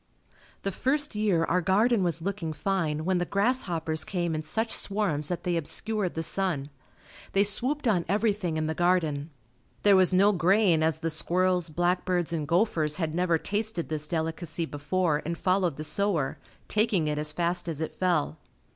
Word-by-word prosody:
The 195 - -1
first 290 +7 0
year 205 -6 +1
our 180 +2 +1
garden 210 +5 +3
was 170 -2 -1
looking 185 -4 -3
fine 155 -4 -1
when 185 -1 +1
the - - +1
grasshoppers 175 -7 0
came 175 -3 -2
in 155 - -2
such 220 +9 -1
swarms 185 -8 0
that 175 0 -3
they 175 -1 0
obscured 195 +4 -2
the 160 - -1
sun. 160 -6 -2 0.6
They 195 - +4
swooped 250 +8 -1
on 180 -6 +2
everything 200 -5 0
in 155 - -1
the 160 - -1
garden. 165 -4 +1 0.5
There 205 -1 +6
was 185 -1 +5
no 195 +3 +5
grain 185 -1 +3
as 160 0 +1
the 165 -1 -1
squirrels, 180 +2 +1
black 175 +3 0
birds 175 -2 -1
and 155 -3 -2
gophers 165 -4 +2
had 160 -3 -2
never 175 -1 +2
tasted 205 0 -2
this 150 -1 -2
delicacy 165 +1 -2
before 155 +1 -1
and 170 +1 -3
followed 185 -4 +1
the 155 - -4
sower, 170 -4 -1 0.3
taking 215 -6 +1
it 150 0 -1
as 150 0 +1
fast 175 +2 -1
as 155 -3 -4
it 160 - -3
fell. 170 -4 0
175 Hz, 175 wpm, -27 LUFS, 160-195 Hz, 0.6 s, There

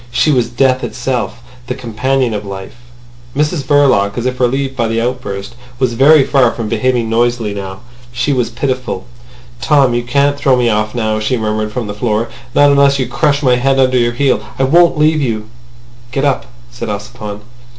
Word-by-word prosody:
She 150 +5 +2
was 125 -4 +1
death 130 +1 +1
itself—the 120 0 -4
companion 130 0 -1
of 105 -1 -3
life. 95 0 -8 0.6
Mrs 150 +1 0
Verloc, 130 -8 +2
as 120 - -2
if 130 0 -2
relieved 135 +2 0
by 120 -3 0
the 115 0 -1
outburst, 115 -4 -4 0.2
was 125 -2 0
very 140 +4 +6
far 130 -3 +3
from 115 -2 -4
behaving 120 +1 0
noisily 115 -1 0
now. 95 0 -7 0.3
She 130 +4 0
was 125 -3 0
pitiful. 125 -5 -3 0.6
"Tom, 135 0 +3
you 120 - +1
can't 140 +3 +1
throw 140 -2 +3
me 120 -1 +2
off 110 +1 -1
now," 110 -2 0
she 115 +4 0
murmured 110 -1 -2
from 120 0 -3
the 105 - -5
floor. 110 +1 -1 0.3
"Not 145 0 +5
unless 140 0 +4
you 130 - 0
crush 145 +2 0
my 125 -2 +4
head 135 +2 +1
under 130 -1 +3
your 120 0 +1
heel. 130 +1 +1 0.2
I 135 - +1
won't 170 +4 +4
leave 155 0 +3
you." 110 -4 -2 0.6
"Get 135 +2 -1
up," 140 -2 0 0.2
said 120 -2 -6
Ossipon. 105 0 -6
125 Hz, 180 wpm, -15 LUFS, 115-135 Hz, 0.6 s, very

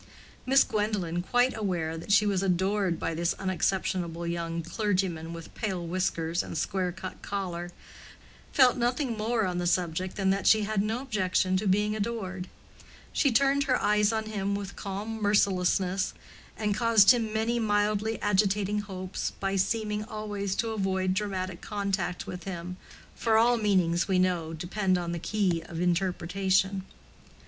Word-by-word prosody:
Miss 270 +1 +6
Gwendolen, 205 -5 -1
quite 245 +7 +2
aware 175 -7 -2
that 165 +5 -6
she 205 +1 +5
was 195 -3 +1
adored 190 -1 +1
by - - -2
this 170 +1 0
unexceptionable 185 -2 -1
young 170 0 -3
clergyman 180 -3 -1
with 165 -1 -9
pale 190 -6 -3
whiskers 170 -1 -1
and - - -6
square 190 -3 -1
cut 185 +1 -8
collar, 180 -3 -4 0.8
felt 260 -3 +5
nothing 245 +1 0
more 220 +1 0
on 180 -1 -2
the 175 - -1
subject 180 +1 0
than 195 -2 +1
that 195 0 0
she 220 -1 +6
had 210 -1 0
no 220 +5 -2
objection 185 -6 +1
to 200 +2 -1
being 210 +3 +2
adored: 200 -4 -3 0.7
she 280 - +3
turned 275 +3 +3
her 255 -2 +2
eyes 210 0 +3
on 220 -1 -1
him 200 -2 -2
with 200 -1 -5
calm 210 +3 -5
mercilessness 190 -2 +2 0.4
and 210 -1 0
caused 225 -1 +6
him 230 -3 +1
many 225 +2 0
mildly 210 0 +1
agitating 205 0 +2
hopes 190 -2 -4
by 195 0 -1
seeming 210 +2 0
always 205 -3 -3
to 230 +1 -1
avoid 190 -3 0
dramatic 190 -3 -3
contact 195 -4 -2
with 180 - -7
him—for 180 +5 -3
all 240 +2 +5
meanings, 185 -5 +2
we 190 -2 +2
know, 180 -3 +1
depend 185 +3 0
on 175 -1 -3
the 170 - -3
key 185 -3 0
of 165 - -6
interpretation. 190 +2 +1
195 Hz, 155 wpm, -28 LUFS, 180-215 Hz, 0.8 s, Miss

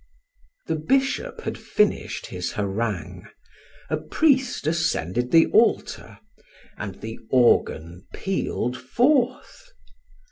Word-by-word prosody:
The - - -1
bishop 270 - 0
had - - -5
finished 210 -1 0
his 90 -1 -5
harangue, 100 -2 -3 0.6
a - - -1
priest 265 - +1
ascended 140 - 0
the 165 +3 +6
altar, - - +1 0.6
and 100 -2 -7
the 110 0 -7
organ 90 -8 +2
pealed 155 -9 -2
forth. 255 - 0
150 Hz, 95 wpm, -24 LUFS, -, 0.6 s, the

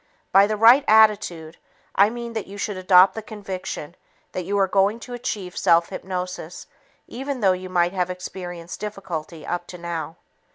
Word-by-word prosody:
By 195 +1 +6
the 215 0 -2
right 235 +6 +7
attitude, 210 -7 +3 0.4
I 200 +2 +5
mean 235 0 -6
that 220 -2 -4
you 200 +1 -10
should 205 0 -3
adopt 185 0 +6
the 220 - -5
conviction 190 -6 -7 0.4
that 180 - -4
you 200 +2 -1
are 195 -1 +3
going 200 +4 +2
to 245 - -8
achieve 205 -6 -5
self 170 0 +3
hypnosis 180 -2 -6 0.4
even 270 +1 -5
though 195 -2 +5
you 185 0 -6
might 175 0 +1
have 180 -2 -1
experienced 180 -1 -7
difficulty 180 -6 -6
up 175 0 -3
to 180 - -9
now. 170 -1 -5
190 Hz, 170 wpm, -23 LUFS, 175-210 Hz, 0.4 s, right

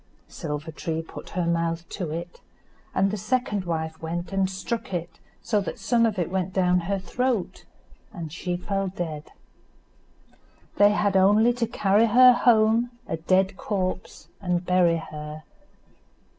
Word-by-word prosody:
Silver 150 -1 -5
tree 160 0 -3
put - - -10
her 180 - +1
mouth 170 0 -1
to 180 -5 -4
it, 170 +3 -6 0.5
and 195 +1 +2
the 210 - -2
second 210 -3 -1
wife 160 -1 -3
went 170 +1 -4
and 195 -1 +1
struck 190 +1 -4
it 170 -1 -5 0.2
so 210 - +1
that - - -5
some 230 -2 +2
of 210 -3 -3
it 175 -1 -1
went 190 -1 -2
down 180 -1 +3
her 195 +3 -2
throat, 235 +2 -2 0.5
and 165 -5 -7
she 175 0 -3
fell 195 +2 -2
dead. 160 -5 -5 1.5
They 205 0 +7
had 205 -2 +1
only 210 +5 +5
to 235 -1 -1
carry 210 +3 +3
her 250 +3 +8
home 230 0 +4 0.2
a 165 - -2
dead 185 +3 +1
corpse 185 -3 -3
and 180 -2 -1
bury 180 -2 +3
her. 150 -1 -8
185 Hz, 150 wpm, -25 LUFS, 170-205 Hz, 1.5 s, her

